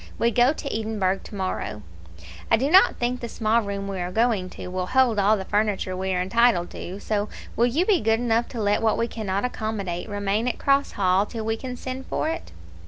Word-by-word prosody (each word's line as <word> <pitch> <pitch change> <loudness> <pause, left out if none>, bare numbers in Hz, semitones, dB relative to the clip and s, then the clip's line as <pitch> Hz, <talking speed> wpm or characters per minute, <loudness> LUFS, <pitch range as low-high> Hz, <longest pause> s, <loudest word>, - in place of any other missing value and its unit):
We 235 - +2
go 245 +3 +4
to 285 -4 -5
Edinburgh 210 -4 0
tomorrow. 185 - -4 0.7
I - - +5
do 270 +6 0
not 375 +2 +6
think 245 +1 -1
the 235 - -5
small 225 +1 +1
room 200 -1 -4
we 195 -1 -4
are 180 0 -3
going 220 -3 +1
to - - -8
will 185 0 -3
hold 255 -3 +3
all 205 +2 +4
the 190 - -5
furniture 205 -3 0
we 190 +1 -2
are 180 - 0
entitled 230 -3 +2
to, 185 +3 -7
so 210 0 -1 0.3
will 235 - +3
you 300 +9 +1
be 385 -6 +3
good 225 +1 +2
enough 235 -1 +1
to 240 - -7
let 205 -1 +1
what 220 -1 +2
we 230 - 0
cannot 205 -2 -2
accommodate 215 -6 -3
remain 205 +3 -1
at 250 - -1
Cross 275 0 +2
Hall 190 +1 +2
till 225 -2 -5
we 225 0 0
can 250 +2 -6
send 260 +1 -6
for 315 - -1
it?" 330 +1 -5
220 Hz, 220 wpm, -24 LUFS, 195-240 Hz, 0.7 s, not